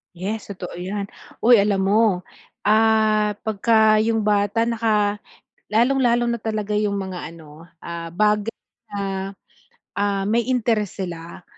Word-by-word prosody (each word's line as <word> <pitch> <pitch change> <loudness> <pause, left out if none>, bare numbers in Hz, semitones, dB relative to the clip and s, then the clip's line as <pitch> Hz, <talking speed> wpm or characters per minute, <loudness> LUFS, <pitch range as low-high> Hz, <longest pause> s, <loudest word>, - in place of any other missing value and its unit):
Yes, 205 +5 -5
totoo 185 -2 -7
yan. 195 +3 -4 0.3
Uy, 240 +1 +6
alam 195 -2 +1
mo, 205 -3 +2 0.4
ah, 215 0 +3 0.2
pagka 220 0 +3
yung 225 -1 0
bata 205 +2 +2
naka 215 -3 0 0.5
lalong-lalo 240 0 +3
na 235 - -1
talaga 215 -1 -2
yung 210 -1 0
mga 190 -4 -5
ano, 160 0 -14 0.2
ah, 170 0 -6
bagay 210 +2 +1 0.4
na, 195 -1 -3 0.7
ah, 200 -1 0
may 225 +4 0
interest 225 -6 0
sila, 170 -2 -8
210 Hz, 125 wpm, -22 LUFS, 195-220 Hz, 0.7 s, Uy